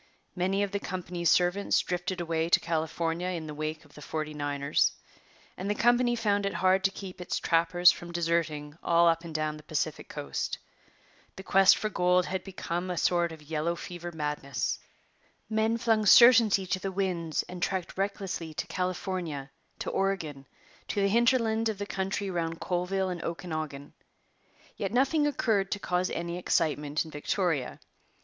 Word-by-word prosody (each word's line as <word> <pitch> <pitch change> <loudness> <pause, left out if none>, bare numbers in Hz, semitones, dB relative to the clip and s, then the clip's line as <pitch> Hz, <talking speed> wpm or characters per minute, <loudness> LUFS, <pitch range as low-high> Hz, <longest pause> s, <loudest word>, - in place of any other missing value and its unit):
Many 190 +2 +1
of 200 - -2
the 200 - -1
company's 180 -2 -2
servants 180 +3 +3
drifted 180 0 -2
away 165 -1 -1
to - - +5
California 165 +1 -2
in 170 -3 -3
the 150 - -6
wake 155 +1 -4
of 145 - -21
the 150 - -12
'Forty 155 +1 -4
Niners,' 145 -1 +1 0.6
and 190 +2 -4
the 210 - +1
company 240 +2 +3
found 205 -3 +1
it 200 - -2
hard 190 0 +3
to - - +5
keep 190 -2 -9
its 180 - -2
trappers 170 +1 +4
from 175 0 -8
deserting 165 -3 -1
all 170 0 +4
up 165 0 +2
and 165 -2 -8
down 155 0 -1
the - - -12
Pacific 155 - -2
Coast. 70 -1 -3 0.8
The 190 - -9
quest 195 0 +6
for 215 - -1
gold 180 -2 +2
had 190 0 -3
become 185 -1 -4
a 180 - -2
sort 175 -1 +2
of 160 -2 -11
yellow 160 +2 -1
fever 175 0 -7
madness. 150 -4 -2 0.7
Men 220 +1 +2
flung 225 -2 +2
certainty 230 -4 +7
to 185 0 -1
the 195 +1 -3
winds 180 -5 -1
and 180 0 -9
trekked 185 -2 -2
recklessly 190 -5 -3
to - - -2
California, 180 -6 -3 0.3
to - - -4
Oregon, 160 -9 -2 0.4
to - - -2
the 200 0 +3
hinterland 230 0 +3
of 215 - -3
the 205 - -4
country 195 0 -2
round 165 -2 -2
Colville 185 +1 -1
and 175 -2 -5
Okanagan. 155 -4 -5 0.8
Yet 195 -1 -3
nothing 275 +4 +3
occurred 225 -9 +1
to - - 0
cause 180 -1 0
any 170 +1 -3
excitement 150 -3 0
in 160 - -10
Victoria. 150 -2 -1
180 Hz, 170 wpm, -29 LUFS, 160-195 Hz, 0.8 s, certainty